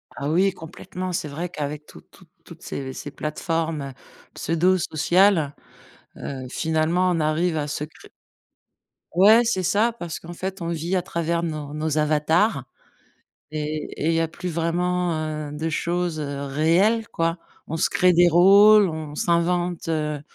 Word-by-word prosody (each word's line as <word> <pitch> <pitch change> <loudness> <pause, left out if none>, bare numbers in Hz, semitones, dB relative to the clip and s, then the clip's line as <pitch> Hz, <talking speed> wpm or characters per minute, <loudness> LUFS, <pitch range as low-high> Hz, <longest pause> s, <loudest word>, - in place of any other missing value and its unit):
Ah 140 +1 -3
oui, 190 +4 +3
complètement, 180 +2 -7
c'est 160 -3 -2
vrai 165 +5 -5
qu'avec 150 -1 -5
toutes - - -16
toutes - - -20 0.2
toutes - - -13
ces 130 -1 -6
ces 145 - -7
plateformes, 160 0 -2
heu, 135 -1 -6 0.4
pseudo 175 +3 +2
sociales, 165 -1 +2 0.6
heu, 130 -2 -6
finalement 160 +4 +1
on 165 - 0
arrive 160 +2 0
à 150 -1 -2
se 145 - -3
cré 155 - -12 1.0
Ouais, 215 +7 +6
c'est 225 -5 0
ça, 220 +6 +2
parce 175 -7 -6
qu'en 170 +1 -9
fait 190 +1 -5
on 170 - -3
vit 170 +3 -2
à 180 - 0
travers 170 0 -2
nos 155 -3 -4
nos 155 0 -2
avatars 150 - +2 0.9
et 155 0 -4 0.2
et - - +2
il - - +3
y 165 - +2
a 165 - 0
plus 180 +3 -6
vraiment, 175 +1 0 0.3
heu, - - -8
de 160 +2 -3
choses, 170 -1 -1
heu, 140 -1 -4
réelles, 170 +11 +2
quoi. 165 +1 -1 0.3
On 160 - -4
se - - +2
crée 180 0 +3
des 175 +1 +5
rôles. 200 +4 +7
On 155 -2 -6
s'invente, 175 +1 0
heu, 150 -2 -1
165 Hz, 165 wpm, -23 LUFS, 155-180 Hz, 1.0 s, rôles